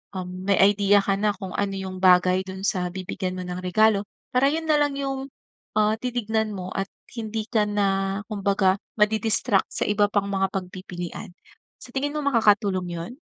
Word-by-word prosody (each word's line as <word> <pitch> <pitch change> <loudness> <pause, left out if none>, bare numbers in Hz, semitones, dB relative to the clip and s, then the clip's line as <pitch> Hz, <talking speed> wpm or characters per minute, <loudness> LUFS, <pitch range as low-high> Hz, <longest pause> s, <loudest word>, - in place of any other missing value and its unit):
Um, 185 0 -5
may 200 - +3
idea 205 0 +5
ka 195 0 +1
na 210 0 +2
kung 185 0 -7
ano 200 -1 -1
yung 190 -1 -5
bagay 185 0 +5
dun 190 0 -7
sa 180 -2 -1
bibigyan 185 0 -4
mo - - -4
ng 180 0 -4
regalo 205 +2 +3 0.3
para 255 +2 +3
yun 320 +1 -2
nalang 295 -2 +2
yung, 270 -1 -2 0.6
ah, 215 0 +3
titignan 220 -3 -1
mo 185 -1 -5
at 195 0 -1 0.3
hindi 220 -1 -4
ka 220 -3 +2
na 195 -1 0
kumbaga 200 -2 +1 0.2
madi-distract 215 0 +2
sa - - -1
iba 205 0 +3
pang 200 -1 +1
mga 195 -1 +1
pagpipilian. 185 0 -6 0.5
Sa - - -12
tingin 285 +2 -1
mo 300 - -2
makakatulong 205 -8 +2
yun? 170 +4 -5
200 Hz, 170 wpm, -24 LUFS, 185-220 Hz, 0.6 s, idea